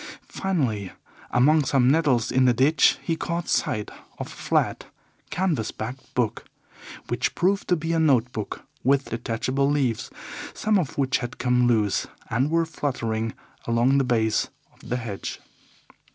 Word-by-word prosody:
Finally, 125 - -1 0.4
among 150 +5 +4
some 135 -2 +3
nettles 135 -5 +3
in 130 0 +4
the 125 -1 +4
ditch, 140 +7 +4
he 165 - 0
caught 170 +1 -3
sight 105 -1 0 0.3
of - - -4
a - - -12
flat, - - 0 0.4
canvas 160 - 0
backed 125 +5 -7
book, 120 -4 0 0.6
which - - -1
proved 195 +3 +1
to 180 - +3
be 165 0 -2
a 165 - +2
note 130 -6 +3
book 110 - -5 0.2
with 135 +2 +2
detachable 120 +4 0
leaves, 135 -6 0 0.5
some 215 -2 +2
of 155 -7 -3
which 135 -2 +2
had 120 0 -5
come 125 -1 +2
loose 110 -4 +2 0.2
and 130 +6 +2
were 165 +1 +2
fluttering 115 -8 -2 0.3
along 120 +4 +3
the - - +3
base 115 -4 +1 0.2
of - - -27
the 125 - 0
hedge. 115 -5 -5
130 Hz, 150 wpm, -25 LUFS, 115-155 Hz, 0.6 s, among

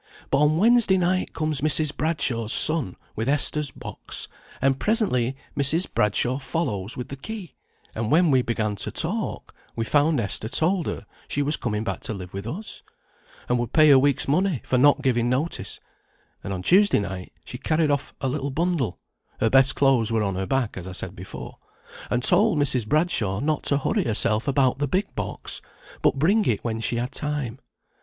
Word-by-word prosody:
But 140 - +3
on 150 +1 +3
Wednesday 220 -1 +4
night 185 +1 0
comes 155 -2 -1
Mrs. 155 0 +1
Bradshaw's 135 -8 -1
son 155 - +1 0.2
with 115 +4 -2
Esther's 145 0 +1
box, - - -7 0.3
and 135 0 +1
presently 135 - +1 0.2
Mrs. 150 +6 +2
Bradshaw 120 +5 +1
follows 120 - -3
with 125 - -5
the 140 - -5
key; 190 +4 -8 0.4
and 110 0 -3
when 165 +2 +4
we 130 -1 +4
began 110 -3 -1
to - - -3
talk, - - -3 0.2
we 115 - -2
found 145 +2 +2
Esther 110 0 -3
told 175 +4 +1
her - - -4 0.2
she 145 - -1
was 150 +2 +1
coming 105 -3 -2
back - - -3
to 110 - -4
live 90 -2 -9
with 100 +2 -5
us, 195 - -7 0.7
and 125 0 +1
would 120 -1 -3
pay 155 -1 +6
her 135 -2 +8
week's 140 0 +1
money 170 - +1
for 130 - +1
not 145 +1 +4
giving 120 -3 +2
notice; 130 - -2 0.6
and 100 - -5
on 90 -2 -4
Tuesday 200 - +5
night 95 -2 -5
she - - -8
carried 155 -1 +1
off 145 -1 -1
a 135 - 0
little 140 +1 -2
bundle 155 - -1 0.4
(her 110 - +2
best 135 0 +5
clothes 130 -5 +3
were 110 -1 +1
on 100 -1 -1
her 95 +1 -3
back, 135 -7 -1
as 95 -1 -7
I 95 - -6
said - - -4
before), - - -9 0.5
and 125 0 0
told 210 - +4
Mrs. 130 -6 +1
Bradshaw 120 - +1
not 150 +2 0
to 140 - +2
hurry 195 +7 0
herself 110 +2 +2
about 135 -1 +2
the 145 - 0
big 190 +8 -1
box, - - -5 0.4
but - - +3
bring 195 +10 +3
it 110 - 0
when 115 -1 -2
she 115 - -1
had 120 +2 -2
time. 145 -6 -3
135 Hz, 190 wpm, -24 LUFS, 115-155 Hz, 0.7 s, her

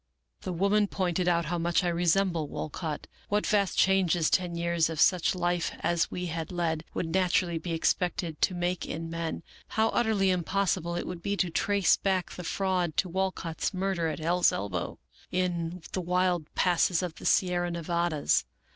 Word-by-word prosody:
" - - -49
The - - -1
woman 200 +4 +2
pointed 180 -2 -1
out 170 -1 +2
how 170 +2 -2
much 170 +2 +1
I - - 0
resembled 170 -2 +1
Walcott, 155 0 -4 0.2
what 210 +1 +1
vast 200 -3 +1
changes 185 -4 +3
ten 175 -2 +1
years 170 -1 +1
of 160 -2 -5
such 180 +2 +4
life 175 -1 0
as 170 -1 +1
we 180 - -4
had 165 -1 -4
led 165 -3 -1
w^ould 165 -2 -2
naturally 180 -2 +2
be 165 +1 -4
expected 170 -1 -1
to 185 - +2
make 175 0 -1
in 165 +1 -5
men, 165 0 -3 0.2
how 220 +1 +1
utterly 215 -5 +2
impossible 180 -1 0
it 175 - -3
would 180 -1 -6
be 200 +3 -2
to 180 -3 0
trace 200 +3 +3
back 190 -2 0
the 180 - -7
fraud 180 -2 -1
to 185 - +1
Walcott's 190 -1 -2
murder 185 -3 0
at 160 - -3
Hell's 175 +3 +3
Elbow, 95 -3 -3 0.3
in 175 -1 -1
the 185 - -2
wild 180 -2 0
passes 180 0 +2
of 175 -3 -3
the - - -10
Sierra 175 -1 +2
Nevadas. 170 -2 0
175 Hz, 175 wpm, -28 LUFS, 165-185 Hz, 0.3 s, such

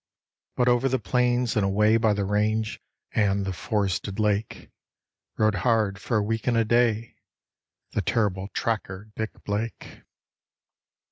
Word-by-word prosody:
But 125 - +2
over 125 +2 +3
the 130 - +1
plains 120 +3 +1
and 105 - +2
away 105 +3 +3
by 110 -2 +3
the 100 -1 -1
range 105 +2 0 0.3
and 100 -2 +1
the 95 - -2
forested 100 +1 -2
lake, 105 0 -1 0.7
Rode 110 -1 +3
hard, 105 0 +1
for 115 - 0
a 105 - +2
week 115 +3 -2
and 120 -2 +3
a 115 - +3
day, 115 -1 +1 0.7
the - - 0
terrible 95 0 0
tracker, 105 -2 -3
Dick 110 0 -5
Blake. 105 +3 -4
110 Hz, 140 wpm, -26 LUFS, 100-115 Hz, 0.7 s, over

